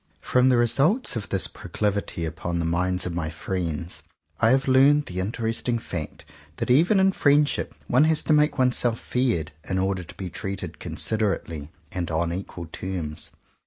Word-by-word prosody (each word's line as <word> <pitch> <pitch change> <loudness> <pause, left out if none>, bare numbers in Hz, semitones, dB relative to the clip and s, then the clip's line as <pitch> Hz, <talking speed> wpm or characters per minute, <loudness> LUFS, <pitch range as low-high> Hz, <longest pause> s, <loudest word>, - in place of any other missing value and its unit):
From 125 +1 +3
the 125 - +4
results 135 - +2
of 110 -3 -4
this 95 - +1
proclivity 100 -5 -2
upon 85 +2 -3
the 85 - -1
minds 90 +2 +1
of 90 - -3
my 80 -2 -2
friends, 85 -2 -3 0.4
I 110 - +4
have 135 +2 +3
learned 140 +3 +5
the 90 0 -5
interesting 115 +4 -1
fact 85 -8 -6 0.3
that - - -1
even 170 +10 +5
in 190 0 +5
friendship 145 -4 +2
one 130 +5 +4
has 160 -1 +2
to 155 - +2
make 150 -1 +3
oneself 125 -3 +2
feared 120 -12 0 0.2
in 95 - 0
order 95 -1 0
to 85 - -12
be 95 -3 -6
treated 95 -5 -5
considerately 85 -9 -2 0.2
and 90 -2 -3
on 85 +1 0
equal 90 -2 -6
terms. 80 -2 -4
100 Hz, 165 wpm, -25 LUFS, 85-130 Hz, 0.4 s, learned